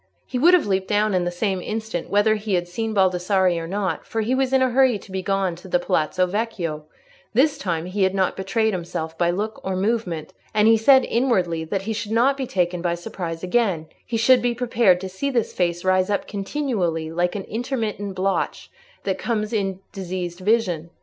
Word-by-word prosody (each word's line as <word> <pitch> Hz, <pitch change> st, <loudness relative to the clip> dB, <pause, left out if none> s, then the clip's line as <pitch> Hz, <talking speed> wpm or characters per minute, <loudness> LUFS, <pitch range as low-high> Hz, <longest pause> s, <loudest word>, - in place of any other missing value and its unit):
He 250 Hz, -, -3 dB
would 345 Hz, +7 st, +7 dB
have 355 Hz, -, +2 dB
leaped 190 Hz, -1 st, 0 dB
down 210 Hz, 0 st, +2 dB
in 180 Hz, -1 st, +1 dB
the -, -, 0 dB
same 190 Hz, +1 st, -1 dB
instant, 215 Hz, -4 st, -4 dB
whether 205 Hz, +2 st, +3 dB
he 210 Hz, -2 st, -1 dB
had 175 Hz, 0 st, -1 dB
seen 220 Hz, +5 st, -3 dB
Baldassarre 190 Hz, -1 st, +2 dB
or 165 Hz, -, -5 dB
not, 195 Hz, +1 st, -2 dB
for 225 Hz, -, -3 dB
he 225 Hz, +4 st, 0 dB
was 265 Hz, 0 st, +1 dB
in 265 Hz, -1 st, +4 dB
a 255 Hz, -, +1 dB
hurry 260 Hz, -2 st, +4 dB
to 195 Hz, -, -15 dB
be 190 Hz, 0 st, -2 dB
gone 195 Hz, -1 st, 0 dB
to 180 Hz, -, -12 dB
the 180 Hz, -, +2 dB
Palazzo 175 Hz, +1 st, +1 dB
Vecchio: 180 Hz, -6 st, -3 dB, 0.5 s
this 280 Hz, +5 st, +4 dB
time 170 Hz, -3 st, -2 dB
he 190 Hz, +3 st, -3 dB
had 190 Hz, 0 st, +2 dB
not 190 Hz, -1 st, +1 dB
betrayed 220 Hz, +3 st, 0 dB
himself 165 Hz, -2 st, -4 dB
by 170 Hz, +1 st, +1 dB
look 210 Hz, +5 st, -3 dB
or 190 Hz, 0 st, -2 dB
movement, 190 Hz, -6 st, -1 dB, 0.2 s
and 210 Hz, 0 st, +5 dB
he 225 Hz, -, +7 dB
said 260 Hz, +4 st, +5 dB
inwardly 185 Hz, -10 st, +1 dB
that 195 Hz, +4 st, -2 dB
he 220 Hz, +2 st, -2 dB
should 215 Hz, 0 st, -4 dB
not 255 Hz, +4 st, +4 dB
be 270 Hz, -2 st, -4 dB
taken 180 Hz, -3 st, 0 dB
by 170 Hz, -1 st, 0 dB
surprise 175 Hz, -3 st, -6 dB
again; 185 Hz, -5 st, +1 dB, 0.2 s
he 230 Hz, -, -3 dB
should 250 Hz, +3 st, +5 dB
be 245 Hz, -1 st, 0 dB
prepared 230 Hz, -6 st, +3 dB
to 190 Hz, -, -4 dB
see 190 Hz, +9 st, -3 dB
this 240 Hz, -5 st, 0 dB
face 175 Hz, 0 st, -1 dB
rise 185 Hz, 0 st, +3 dB
up 205 Hz, -, -1 dB
continually 195 Hz, -, -2 dB
like 175 Hz, +2 st, 0 dB
the 200 Hz, -2 st, -5 dB
intermittent 220 Hz, -4 st, -3 dB
blotch 190 Hz, +1 st, -1 dB, 0.3 s
that -, -, -2 dB
comes 215 Hz, -1 st, -2 dB
in 195 Hz, -3 st, -1 dB
diseased 180 Hz, -2 st, -5 dB
vision. 185 Hz, -5 st, +1 dB
195 Hz, 210 wpm, -23 LUFS, 180-225 Hz, 0.5 s, would